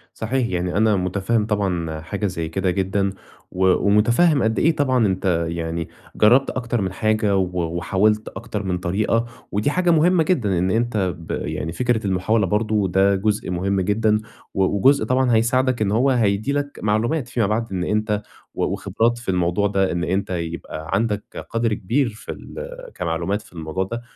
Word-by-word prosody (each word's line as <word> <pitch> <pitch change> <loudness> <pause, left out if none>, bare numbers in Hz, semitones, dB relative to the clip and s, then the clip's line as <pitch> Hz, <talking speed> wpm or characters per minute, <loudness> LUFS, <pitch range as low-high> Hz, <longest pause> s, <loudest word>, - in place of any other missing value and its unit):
صحيح، 120 +2 -1
يعني 90 -1 -2
أنا 110 0 +4
مُتفهِّم 100 +4 0
طبعًا 90 -7 -1
حاجة 100 +6 -4
زي 85 -3 -4
كده 95 +2 0
جدًا، 95 +1 0 0.4
و 95 +1 0 0.2
ومُتفهِّم 120 +9 +4
قد 110 0 +1
إيه 160 +1 +3
طبعًا 130 -6 +2
أنت 95 -3 0
يعني 85 0 -3 0.3
جرَّبت 125 +6 +5
أكتر 120 -2 -2
من 95 -1 -1
حاجة 110 0 +1
و 90 -2 0
وحاولت 105 +5 +1
أكتر 105 +1 -5
من 90 -2 -1
طريقة، 105 +6 0 0.3
ودي 105 +7 +1
حاجة 180 +2 +1
مهمة 165 +1 +4
جدًا 120 - +1
إن 90 +2 +1
أنت 110 -5 0
ب 80 -1 -9
يعني 80 - -3
فكرة 120 +1 0
المحاولة 95 +3 +1
برضه 105 +1 +1
ده 95 +2 +3
جزء 105 +2 -1
مهم 95 +2 0
جدًا، 105 +2 +2 0.3
و 95 - +1
وجزء 110 +7 +3
طبعًا 125 +1 +2
هيساعدك 130 +2 +2
إن 100 -2 +1
هو 120 +6 +3
هيدّي 110 -1 +1
لك 145 0 -3
معلومات 115 +7 0
فيما 120 -4 0
بعد، 110 +1 -1
إن 90 -2 -2
أنت 105 +1 0 0.3
و - - -1
وخبرات 105 +4 0
في 120 -3 -7
الموضوع 90 +3 +1
ده، 95 -1 +1
إن 85 0 -2
أنت 95 +3 -1
يبقى 85 -3 -5
عندك 105 0 -2
قدر 115 -1 0
كبير 120 +7 0
في 110 0 -9
ال - - -8 0.2
كمعلومات 85 +6 -2
في - - -19
الموضوع 80 +2 -3
ده، 115 +5 -5
105 Hz, 175 wpm, -22 LUFS, 95-115 Hz, 0.4 s, جرَّبت